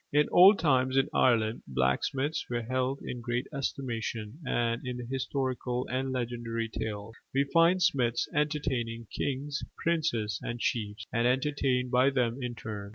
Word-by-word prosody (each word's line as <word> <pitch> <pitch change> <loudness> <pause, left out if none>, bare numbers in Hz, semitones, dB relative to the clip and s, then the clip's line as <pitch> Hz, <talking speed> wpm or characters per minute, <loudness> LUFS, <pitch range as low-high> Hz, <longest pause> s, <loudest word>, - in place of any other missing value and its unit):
In 150 +1 +4
old 195 +4 +8
times 130 -4 +2
in 135 - +3
Ireland, 115 -3 +3
blacksmiths 70 - 0
were 120 -1 -2
held 130 +3 -1
in 125 - -5
great 120 +1 -2
estimation; 120 -4 -3
and 120 -3 0
in 125 -1 -4
the 120 - -6
historical 130 -1 -2
and 130 +1 -1
legendary 120 -2 -3
tales, 110 0 -5 0.2
we 135 - +4
find 170 +2 +5
smiths 125 -9 +2
entertaining 130 -6 -1
kings, 140 +1 -2
princes, 150 -11 0
and 120 +1 -4
chiefs, 105 -2 -2
and 120 0 +2
entertained 130 -1 +1
by 130 +2 +5
them 125 -1 0
in 125 -1 -3
turn. 105 -3 -6
125 Hz, 150 wpm, -29 LUFS, 115-135 Hz, 0.2 s, old